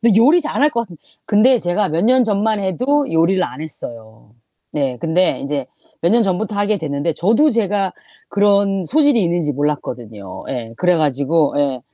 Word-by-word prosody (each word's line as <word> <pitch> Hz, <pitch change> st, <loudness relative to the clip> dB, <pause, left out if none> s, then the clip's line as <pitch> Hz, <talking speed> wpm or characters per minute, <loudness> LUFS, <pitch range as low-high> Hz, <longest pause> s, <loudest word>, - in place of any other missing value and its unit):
근데 225 Hz, -3 st, +4 dB
요리 295 Hz, +10 st, +5 dB
잘할 300 Hz, -1 st, +1 dB
것 235 Hz, -, -1 dB
같은 190 Hz, -7 st, -8 dB, 0.3 s
근데 240 Hz, +5 st, +4 dB
제가 190 Hz, 0 st, -1 dB
몇 165 Hz, +2 st, 0 dB
년 255 Hz, +2 st, +4 dB
전만 215 Hz, 0 st, 0 dB
해도 255 Hz, -, 0 dB
요리를 175 Hz, +3 st, +2 dB
안 -, -, -8 dB
했어요. 115 Hz, -8 st, -10 dB, 0.4 s
네, 135 Hz, -4 st, -1 dB
근데 170 Hz, +5 st, +1 dB
인제 140 Hz, -2 st, -3 dB, 0.3 s
몇 170 Hz, -, +2 dB
년 235 Hz, +2 st, +4 dB
전부터 205 Hz, +2 st, -2 dB
하게 205 Hz, +1 st, +1 dB
됐는데 155 Hz, 0 st, -2 dB
저도 225 Hz, -, +2 dB
제가 205 Hz, -5 st, 0 dB, 0.4 s
그런 200 Hz, -1 st, +2 dB
소질이 290 Hz, -, +3 dB
있는지 170 Hz, -4 st, 0 dB
몰랐거든요. 120 Hz, -9 st, -5 dB
예. 120 Hz, -3 st, -5 dB
그래 180 Hz, -1 st, +3 dB
가지고 150 Hz, +1 st, +1 dB
에 140 Hz, -3 st, 0 dB
185 Hz, 325 characters per minute, -18 LUFS, 150-220 Hz, 0.4 s, 요리